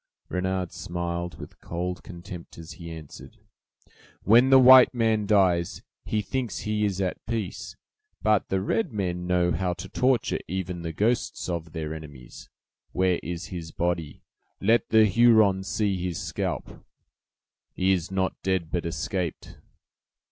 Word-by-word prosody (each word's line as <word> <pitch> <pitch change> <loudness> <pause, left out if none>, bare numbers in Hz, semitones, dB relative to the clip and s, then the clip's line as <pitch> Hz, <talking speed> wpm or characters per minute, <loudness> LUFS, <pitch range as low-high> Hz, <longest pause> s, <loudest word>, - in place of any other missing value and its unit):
Renard 95 -1 -2
smiled 85 0 -4
with - - -11
cold 90 +1 -4
contempt, 85 -2 -10
as 80 0 -9
he 85 +1 -9
answered: 80 -3 -11 0.9
"When 120 +6 +6
the 135 - +8
white 130 0 +8
man 110 -3 +1
dies, 90 -5 +2 0.2
he 105 -1 -1
thinks 125 0 -3
he 105 0 -1
is 100 -2 -1
at 95 -2 -2
peace; 110 -5 -4 0.5
but 105 -1 +2
the 95 -1 0
red 170 - 0
men 90 -4 -3
know 90 -1 +2
how 90 +3 0
to 85 - -8
torture 130 -3 +1
even 90 0 -4
the 85 -1 -4
ghosts 110 +8 -1
of 85 -2 -4
their 80 -1 -4
enemies. 75 -6 -11 0.4
Where 90 -1 +2
is 85 +2 -5
his 80 -2 -6
body? 85 -3 -2 0.4
Let 115 +4 +2
the 110 0 +6
Hurons 105 -3 +4
see 95 -1 -1
his 90 -3 -3
scalp." - - -4 0.9
"He 95 +1 +2
is 90 -3 0
not 95 -1 -2
dead, 95 -4 -1
but 85 -1 -1
escaped." 85 +2 -4
90 Hz, 145 wpm, -26 LUFS, 85-105 Hz, 0.9 s, the